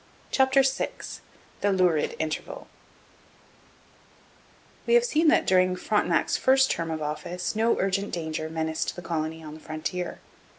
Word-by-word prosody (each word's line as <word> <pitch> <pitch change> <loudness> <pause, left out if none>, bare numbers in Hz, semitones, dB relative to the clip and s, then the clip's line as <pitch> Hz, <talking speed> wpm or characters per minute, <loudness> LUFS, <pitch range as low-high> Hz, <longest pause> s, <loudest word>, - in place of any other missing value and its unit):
CHAPTER 265 0 +4
VI 265 0 0 0.7
THE 205 - +2
LURID 180 -5 +2
INTERVAL 155 0 -4 2.2
We 475 - +5
have 480 0 +5
seen 325 -8 +2
that 315 - +4
during 185 -1 +3
Frontenac's 180 -3 +1
first 265 0 +4
term 165 -1 -2
of 160 -1 -3
office 170 +6 -4
no 225 +2 +2
urgent 195 +1 0
danger 160 -2 -3
menaced 160 0 -2
the 180 - -8
colony 160 -1 -3
on 150 -1 -8
the 155 - -10
frontier. 160 +4 -4
180 Hz, 135 wpm, -26 LUFS, 160-220 Hz, 2.2 s, We